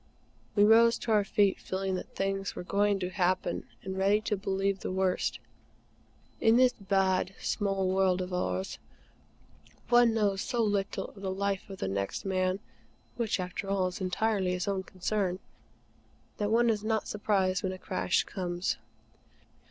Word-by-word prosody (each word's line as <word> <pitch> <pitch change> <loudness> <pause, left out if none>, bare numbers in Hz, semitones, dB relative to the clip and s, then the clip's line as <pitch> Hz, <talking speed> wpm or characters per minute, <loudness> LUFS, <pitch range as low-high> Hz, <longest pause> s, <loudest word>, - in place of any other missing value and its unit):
We 205 - +5
rose 230 +2 +6
to 230 - -3
our 210 -2 +4
feet, 200 -1 +2
feeling 190 0 -3
that 185 - -5
things 195 0 -2
were - - -5
going 200 +2 +2
to 180 0 -2
happen 185 0 0 0.2
and 190 0 -4
ready 200 +2 +4
to 210 0 -1
believe 195 0 -1
the - - -4
worst. 185 -1 0 1.0
In 225 +1 +5
this 255 0 +5
bad, 190 -2 0
small 195 -3 0
world 185 -1 +2
of 185 0 -4
ours, 95 - -2 1.1
one 240 -1 +5
knows 200 -3 +1
so 240 -2 0
little 200 -2 -1
of 195 - -14
the 195 - -2
life 195 +1 -2
of 195 - -7
the - - -3
next 100 - -3
man 185 0 0 0.6
which, 230 -4 -1
after 185 +2 -4
all, 195 -2 +1
is 180 - -8
entirely 190 0 0
his 180 +1 -2
own 195 -1 0
concern 185 0 -2 1.0
that 205 -1 -1
one 235 +1 +4
is 210 -1 -2
not 220 0 0
surprised 195 -3 +1
when 190 - -1
a 185 - -6
crash 90 - 0
comes. 175 -1 -2
195 Hz, 160 wpm, -30 LUFS, 185-205 Hz, 1.1 s, rose